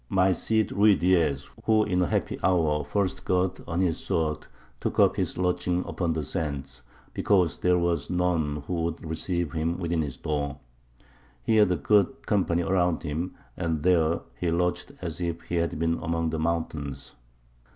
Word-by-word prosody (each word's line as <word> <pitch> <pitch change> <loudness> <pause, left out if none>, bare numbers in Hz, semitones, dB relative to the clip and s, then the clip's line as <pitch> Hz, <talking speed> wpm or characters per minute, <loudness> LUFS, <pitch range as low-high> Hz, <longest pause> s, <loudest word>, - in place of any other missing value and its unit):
My 95 0 +3
Cid 110 +4 +1
Ruydiez, 90 -8 +3
he 70 - -16 0.2
who 110 -1 +4
in 90 -3 +1
a 90 - +2
happy - - -1
hour 80 -5 +2
first 95 +5 -1
girt 90 0 0
on 85 +1 -1
his 85 -4 +1
sword, 80 -2 -1 0.3
took - - -2
up - - +5
his - - -2
lodging 90 0 0
upon 85 -3 -1
the 80 -1 -2
sands, 70 -5 -4 0.3
because 90 -5 +2
there 90 0 +3
was 85 -4 0
none 85 -5 0
who 85 0 -2
would 85 0 -3
receive 85 +1 -1
him 80 +1 -1
within 85 -2 -1
his 70 -4 -4
door. 70 -2 -2 0.9
He 110 - +2
had 105 -3 +5
a - - +3
good 105 - +2
company 90 -5 +1
round 90 -1 +2
about - - -12
him, 80 +4 -3 0.2
and 80 -4 -2
there 85 -2 +3 0.2
he 85 - 0
lodged 90 +1 0
as 85 0 -4
if 85 -1 -2
he 85 - -2
had 85 -2 0
been 80 +1 0
among 80 0 -1
the 80 - -2
mountains.... 80 -4 -3
85 Hz, 175 wpm, -27 LUFS, 80-90 Hz, 0.9 s, up